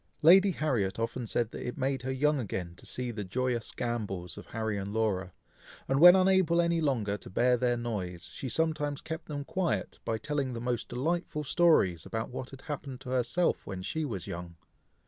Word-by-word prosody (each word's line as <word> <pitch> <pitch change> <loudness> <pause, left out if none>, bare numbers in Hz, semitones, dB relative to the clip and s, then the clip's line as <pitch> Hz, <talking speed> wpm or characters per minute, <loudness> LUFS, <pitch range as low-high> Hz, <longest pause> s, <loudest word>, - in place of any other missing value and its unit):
Lady 190 +5 +8
Harriet 130 - 0
often 115 +1 -2
said 115 +1 0
that - - -6
it 125 - -4
made 135 0 0
her 130 +1 -3
young 145 +2 +2
again 90 -6 -4
to - - -14
see 125 -1 -3
the 105 -2 -4
joyous 120 +3 -1
gambols 100 -8 -3
of - - -10
Harry 110 -1 -2
and 100 0 -4
Laura; 100 -4 0 0.6
and 135 +1 +2
when 175 +3 +10
unable 185 -3 +4
any 170 -1 +2
longer 115 -9 0
to - - -12
bear 125 +6 +3
their 120 0 +1
noise, 100 -7 -4
she 130 - -5
sometimes 150 0 0
kept 160 0 -6
them 145 -2 -4
quiet, 120 - -1
by 115 - -1
telling 140 0 -2
the 115 - -4
most 120 0 -2
delightful 150 +4 -1
stories 145 - +3
about 110 +1 -4
what 130 0 -5
had 135 -1 -11
happened 140 -4 -5
to 130 -1 -7
herself 130 +7 +1
when 95 -2 -5
she 160 +10 -2
was 110 - -4
young. 85 0 -6
125 Hz, 195 wpm, -30 LUFS, 110-150 Hz, 0.6 s, when